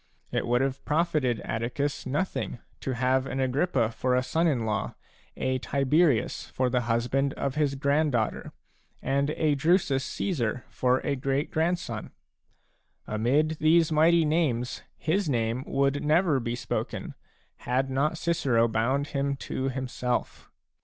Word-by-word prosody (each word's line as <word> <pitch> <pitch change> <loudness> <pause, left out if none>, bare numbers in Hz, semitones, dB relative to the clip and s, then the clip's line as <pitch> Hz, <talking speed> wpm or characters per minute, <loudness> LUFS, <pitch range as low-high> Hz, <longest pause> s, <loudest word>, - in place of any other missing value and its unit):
It - - -1
would 120 +1 +2
have 135 0 -2
profited 150 -7 +1
Atticus 130 +6 -2
nothing 145 0 -2 0.2
to 130 - -3
have 130 +2 +1
an 135 - -3
Agrippa 130 -2 +1
for 125 +2 0
a 125 - +2
son 165 +6 +1
in 125 -8 +1
law, 110 -1 -2 0.4
a 130 0 0
Tiberius 140 -1 +1
for 125 -1 -1
the 125 0 +2
husband 125 +4 +1
of 140 - -2
his 145 -2 0
grand 140 +2 +1
daughter, 110 -3 -1 0.5
and 140 +1 +1
a 155 -2 +2
Drusus 145 -2 +2
Caesar 125 - -2
for 125 0 +1
a 145 - -1
great 135 +2 -1
grandson; 160 -9 -1 1.0
amid 140 +9 +1
these 160 +1 +4
mighty 160 +2 +4
names 145 -6 0 0.2
his 170 +2 0
name 120 0 0
would 140 +1 +1
never 155 -1 +3
be 120 -1 -3
spoken, 120 - -4 0.4
had 130 +2 -1
not 150 +5 +1
Cicero 140 -10 +2
bound 130 +6 0
him 140 0 -1
to 135 0 -3
himself. 125 -1 -3
135 Hz, 140 wpm, -27 LUFS, 125-155 Hz, 1.0 s, these